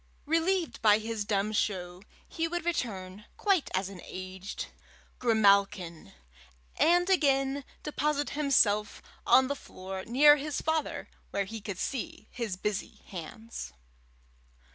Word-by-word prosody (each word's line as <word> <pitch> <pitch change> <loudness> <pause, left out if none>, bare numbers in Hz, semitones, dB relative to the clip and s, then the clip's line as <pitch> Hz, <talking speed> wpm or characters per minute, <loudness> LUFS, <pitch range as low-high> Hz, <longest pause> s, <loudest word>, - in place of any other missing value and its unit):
Relieved 330 +3 +1
by 210 -2 +6
his 220 -1 -3
dumb 205 0 0
show, 180 -4 -1 0.3
he 330 0 -2
would 345 0 -3
return, 210 - -3
quiet 390 -7 +2
as 190 0 0
an 195 -3 -9
aged 185 +1 -6 0.5
grimalkin, 200 - +2 0.6
and 350 +2 +4
again 275 -6 +2 0.2
deposit 295 0 -1
himself 220 -8 +2 0.2
on 260 0 +6
the 285 - -1
floor 190 -6 -7
near 295 +5 +7
his 295 0 -3
father 315 0 -1 0.2
where 200 - -1
he 220 +2 -7
could 200 -3 -5
see 230 -2 -4
his 225 -7 -3
busy 205 +1 -4
hands. 220 +6 -7
225 Hz, 120 wpm, -30 LUFS, 195-295 Hz, 0.6 s, near